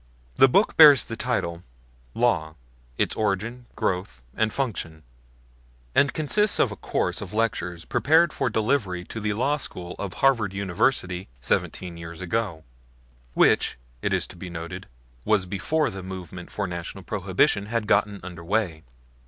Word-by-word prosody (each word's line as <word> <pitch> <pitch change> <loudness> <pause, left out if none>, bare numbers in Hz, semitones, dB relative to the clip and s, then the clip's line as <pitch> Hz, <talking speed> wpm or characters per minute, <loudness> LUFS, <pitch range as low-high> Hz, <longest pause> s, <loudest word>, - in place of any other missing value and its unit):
The 135 - +8
book 195 - +3
bears 145 -6 +9
the 115 - -6
title 100 -8 -2 0.5
"Law: 90 -10 +1 0.4
its - - +1
Origin, 110 +4 -2
Growth 90 -9 -2
and 110 0 +1
Function," 85 - -3 0.9
and 140 - +4
consists 205 +7 +1
of 120 - +3
a - - -5
course - - -2
of - - -7
lectures 90 -7 -1
prepared 160 +3 +3
for 135 - 0
delivery 110 -5 0
to 110 - -7
the 105 -1 -1
law 135 +7 +1
school 90 -10 -7
of 100 -3 -4
Harvard 115 -8 +2
University 95 -1 0
seventeen 85 +7 -1
years 85 0 -8
ago; 95 -3 -2 0.7
which, - - +3 0.2
it - - -1
is - - +1
to - - -12
be 90 +1 -8
noted, 85 +2 -7 0.4
was 105 -4 +2
before 120 - 0
the 95 - -7
movement 90 -2 -8
for 105 - -3
National 85 -2 -6
Prohibition 100 0 +1
had 115 0 -1
got 105 0 +3 0.2
under 90 -2 -8
way. 90 -4 -1
100 Hz, 150 wpm, -25 LUFS, 90-120 Hz, 0.9 s, bears